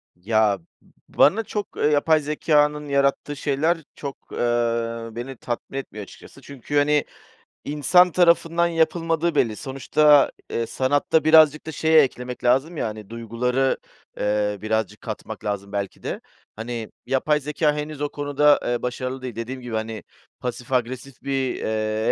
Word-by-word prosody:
Ya, 105 +2 +1
b 85 - -28
bana 205 +10 +5
çok, 210 -1 -5
ııı, 150 - +2
yapay 155 +2 +3
zekânın 150 0 +1
yarattığı 140 +1 +1
şeyler 145 +4 +1 0.2
çok, 140 -2 -8
ııı, 115 -1 -1
beni 125 +2 -6
tatmin 120 +3 -5
etmiyor 110 -6 -6
açıkçası - - -14
çünkü, 140 +1 -5
hani, 145 0 +3 0.6
insan 175 +5 +4
tarafından 170 -1 +3
yapılmadığı 165 0 0
belli. 115 -6 +2
Sonuçta, 140 +4 +3 0.2
eee, 115 - -1
sanatta 145 +5 +1
birazcık 155 -1 +6
da 160 - -5
şeye 160 0 +5
eklemek 125 -2 -3
lazım 135 +7 +2
ya, - - -1
hani, 105 -2 -8
duyguları, 120 +3 -1 0.4
ııı, 105 -1 0
birazcık 110 -2 -2
katmak - - -7
lazım 100 -1 -3
belki 100 -1 -4
de. - - -4 0.3
Hani, 115 0 -5
yapay 150 +3 +1
zekâ 150 +1 0
henüz 150 -1 -5
o 145 - -1
konuda, 145 0 +3
eee, 120 0 -1
başarılı 130 +1 -4
değil. 125 -3 -6
Dediğim 125 +3 -5
gibi, 120 -2 -7
hani, 110 -1 -4 0.4
pasif 125 0 -6
agresif 130 +1 -3
bir, 135 -2 -1
eee, 110 0 -1
135 Hz, 145 wpm, -23 LUFS, 115-150 Hz, 0.6 s, birazcık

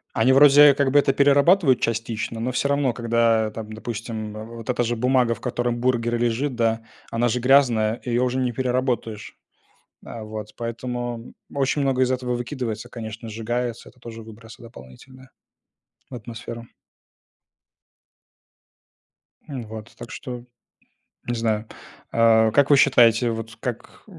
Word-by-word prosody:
Они 115 +3 +3
вроде 145 +1 +7
как 140 -1 +1
бы 145 - +5
это 135 - +2
перерабатывают 140 +1 +4
частично, 115 0 -3
но 120 +3 -2
всё 130 - 0
равно, 140 -3 +1
когда 115 -2 +1
там, 110 0 -8
допустим, 110 -1 -6 0.2
вот 115 0 -10
эта 125 -1 +1
же 120 0 -1
бумага, 125 0 +2
в 115 - -10
которой 120 -1 -1
бургер 120 -1 0
лежит, 120 +3 -1
да, 115 -1 0 0.3
она 115 +1 0
же 125 - -1
грязная, 120 -4 +3
её 120 0 0
уже 125 +1 -1
не 125 -1 0
переработаешь. 125 -4 -2 0.7
А, 115 - -8
вот 110 -1 -8
поэтому 120 0 -5 0.2
очень 140 +1 0
много 135 -2 +1
из 130 0 +2
этого 125 -1 -2
выкидывается, 120 -2 -5
конечно, 115 -1 -8
сжигается, 115 +2 -4
это 125 - -21
тоже 115 -2 -10
выбросы 115 +1 -13
дополнительные 120 - -14 0.8
в 130 - -8
атмосферу. 115 0 -8 2.8
М, 135 -5 -6
вот 110 +1 -9
так 120 -1 -10
что. 125 -2 -7 0.8
Не 120 - -1
знаю. 110 -2 -1 0.5
А 115 -1 +4
как 140 +5 +3
вы 145 - +7
считаете, 120 -3 +4
вот 115 0 -6
как 125 -2 -6
120 Hz, 140 wpm, -23 LUFS, 115-130 Hz, 2.8 s, вроде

